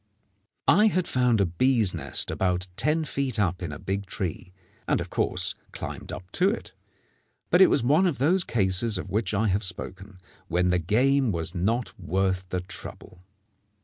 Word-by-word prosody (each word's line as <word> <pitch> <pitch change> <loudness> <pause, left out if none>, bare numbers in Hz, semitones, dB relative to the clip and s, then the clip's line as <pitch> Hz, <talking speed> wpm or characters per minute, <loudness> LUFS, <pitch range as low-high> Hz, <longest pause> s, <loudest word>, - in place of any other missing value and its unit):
I 210 +4 +6
had 185 -4 0
found 125 -3 +2
a 100 - +3
bees' 110 +3 +2
nest - - +3
about 90 -1 0
ten 150 - +1
feet 135 -6 -2
up 90 -3 0
in 85 -4 -4
a 75 - -6
big 100 +1 -4
tree, 95 0 -5 0.4
and - - +2
of - - -6
course - - 0 0.2
climbed - - -7
up 90 +1 -9
to 185 +2 +2
it; 225 - -5 0.8
but 175 - +5
it 190 - +8
was 135 - +2
one 150 +9 +4
of 165 - -1
those 175 +8 +2
cases 100 - +1
of 95 +1 -6
which 105 0 -1
I 105 +3 +1
have 95 +2 +1
spoken, 95 0 -6 0.3
when 90 +2 +1
the 90 0 +2
game 125 - +2
was 80 -3 -3
not 115 +7 -1
worth 95 +1 -1
the 90 -1 -2
trouble. 90 0 -10
100 Hz, 180 wpm, -26 LUFS, 90-130 Hz, 0.8 s, it